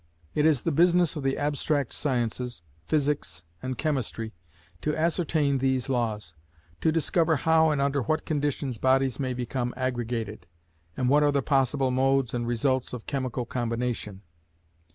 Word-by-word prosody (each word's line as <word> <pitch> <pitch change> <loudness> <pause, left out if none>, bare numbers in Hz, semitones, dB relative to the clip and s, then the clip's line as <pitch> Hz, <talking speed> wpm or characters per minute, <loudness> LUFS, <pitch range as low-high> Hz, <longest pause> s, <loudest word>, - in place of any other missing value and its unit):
It 150 +1 +3
is 150 -6 +2
the 165 - +1
business 175 +2 +4
of 150 - -3
the 135 0 0
abstract 145 -2 0
sciences, 125 - -2 0.2
Physics 145 - -1 0.2
and 130 -1 -4
Chemistry, 120 -7 -2 0.5
to 150 0 -1
ascertain 155 -4 +1
these 130 -1 0
laws: 110 -9 -1 0.5
to 160 - +2
discover 165 0 +2
how 160 +2 +4
and 150 -2 +1
under 140 0 +1
what 155 +7 -1
conditions 145 -5 -1
bodies 130 -1 +2
may 130 -2 -1
become 125 0 -3
aggregated, 120 -6 -3 0.5
and 125 - +1
what 145 +3 +5
are 145 -1 +4
the 140 -2 +1
possible 135 -1 +2
modes 135 -1 +2
and 120 -1 -2
results 130 +2 0
of 120 -3 -6
chemical 130 -3 -2
combination. 115 -4 -3
135 Hz, 150 wpm, -27 LUFS, 120-150 Hz, 0.5 s, what